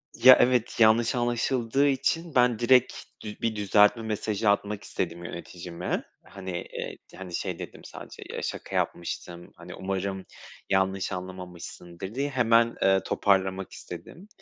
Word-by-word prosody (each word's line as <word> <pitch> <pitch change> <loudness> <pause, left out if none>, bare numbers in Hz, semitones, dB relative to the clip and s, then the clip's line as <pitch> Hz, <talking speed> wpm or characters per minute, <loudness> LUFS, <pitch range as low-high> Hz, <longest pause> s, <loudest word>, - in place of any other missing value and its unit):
Ya 130 +1 +9
evet, 125 -2 +2
yanlış 115 +2 +5
anlaşıldığı 120 +2 +1
için 145 +4 0
ben 125 -3 +4
direkt 125 +1 +4 0.3
dü 105 -1 -7
bir 115 -1 0
düzeltme 105 +2 +4
mesajı 105 -1 -1
atmak 105 0 0
istedim 85 0 -4
yöneticime. 85 0 -5 0.2
Hani, 95 -2 -8 0.2
eee, - - -5 0.2
hani, 90 -2 -6
şey 90 -2 -3
dedim - - -8
sadece - - -10
"Ya - - -5
şaka - - -5
yapmıştım, 85 0 -3
hani, - - -10
umarım 95 0 -3 0.4
yanlış 95 0 +1
anlamamışsındır." 90 +1 -7
diye 140 +1 -1
hemen, 115 -2 +3
eee, 95 0 +4
toparlamak 95 -1 +1
istedim. 190 +5 -10
105 Hz, 135 wpm, -27 LUFS, 95-120 Hz, 0.4 s, Ya